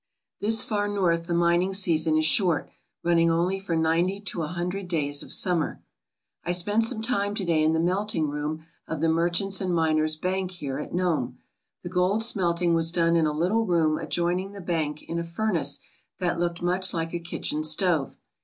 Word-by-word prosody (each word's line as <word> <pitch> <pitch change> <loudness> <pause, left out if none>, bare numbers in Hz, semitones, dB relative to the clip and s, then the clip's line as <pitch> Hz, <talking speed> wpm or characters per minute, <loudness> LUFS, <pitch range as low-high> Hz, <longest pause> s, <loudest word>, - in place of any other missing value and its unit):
" - - -48
This 220 +2 +3
far 205 -1 -1
north 175 -5 0
the 175 - -1
mining 175 +2 +2
season 160 -4 +3
is 155 - +2
short, 170 -2 +2 0.3
running 170 -1 +3
only 175 +4 +1
for 190 -4 -3
ninety 165 +4 +1
to 190 -4 -3
a 155 - -2
hundred 180 +3 -4
days 145 -4 -1
of - - -8
summer. 175 -4 +1 0.6
I 175 - -1
spent 205 +6 +2
some 225 -2 0
time 205 -4 0
to 200 -3 -1
day 165 -2 +2
in 155 +1 +3
the 160 - +1
melting 180 -1 0
room 150 +2 -4 0.2
of 160 - -4
the 165 +1 +2
Merchants' 175 +4 +1
and 185 -1 -1
Miners* 155 -1 +1
Bank 185 +3 -2
here 145 -7 -5
at - - -6
Nome. 165 -9 -1 0.5
The 175 - -5
gold 185 +4 +2
smelting 175 -6 +1
was 165 0 +3
done 170 -1 +2
in 165 -2 +3
a - - 0
little 185 +9 0
room 160 -3 +2
adjoining 180 +3 -1
the 200 - -9
bank 160 -4 -2
in 170 - -4
a - - -2
furnace 170 -5 0 0.4
that 175 -2 -1
looked 170 0 -2
much 180 +1 +1
like 165 0 -3
a 175 - -2
kitchen 160 -2 -3
stove. 155 -2 +1
170 Hz, 195 wpm, -26 LUFS, 160-190 Hz, 0.6 s, This